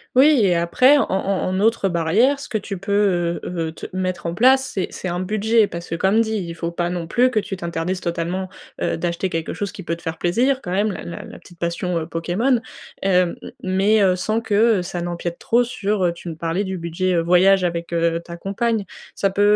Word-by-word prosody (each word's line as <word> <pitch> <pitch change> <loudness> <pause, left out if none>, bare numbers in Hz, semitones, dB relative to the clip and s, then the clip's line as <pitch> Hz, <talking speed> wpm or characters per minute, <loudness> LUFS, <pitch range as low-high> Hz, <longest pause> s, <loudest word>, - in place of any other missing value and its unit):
Oui 275 0 +6
et 185 - +4
après 250 +12 +4
en - - +2
en 195 0 0
en 185 +1 -1
autre 215 -2 +2
barrière, 190 - +2
ce 280 - -7
que 215 - -1
tu 200 -1 -6
peux, 190 -3 +1
heu, 165 -2 -3
heu, - - -7
te - - -8
mettre 185 -2 -2
en 170 - -3
place, 265 +5 +4
c'est 190 - -2
c'est - - -6
un 175 0 -2
budget. 215 +4 +2
Parce 170 -3 -7
que, 165 - -2
comme 195 +6 +3
dit, 220 -1 -1
il 175 -5 -3
faut 170 0 -4
pas, 175 0 -2
non 175 -2 -4
plus, 250 +8 +3
que 220 - +2
tu 200 -2 -5
t'interdises 170 +1 -3
totalement, 175 +2 -2 0.3
heu, - - 0
d'acheter 175 +2 -2
quelque 165 -1 -3
chose 200 -1 -3
qui 195 - -9
peut 165 -1 -3
te 170 - -17
faire 165 0 -4
plaisir. 250 +10 +1
Quand 180 - -7
même, 205 +4 +1
la - - -6
la 170 - -7
la - - -11
petite 175 - -17
passion, 170 +1 -2
heu, 160 - -2
Pokémon, 190 +10 0 0.4
heu, 180 -2 +2 0.3
mais, 195 +3 +3
heu, 185 -2 +4
sans 215 +5 -1
que, 225 -2 -4 0.3
heu, - - -1
ça 175 -1 -4
n'empiète 175 0 -4
trop, 235 +2 +2
heu, - - +3
sur, 210 -4 -1
heu, 170 - +1
tu 170 0 -8
me 160 - -6
parlais 165 +4 -1
du 190 -1 -4
budget, 170 +2 -1
heu, 170 - +3
voyage 180 +3 +4
avec, 170 -1 -2
heu, 165 0 +1
ta 170 0 -9
compagne. 210 +3 -1 0.3
Ça 195 -1 +1
peut, 200 - -1
185 Hz, 240 wpm, -21 LUFS, 170-210 Hz, 0.4 s, Oui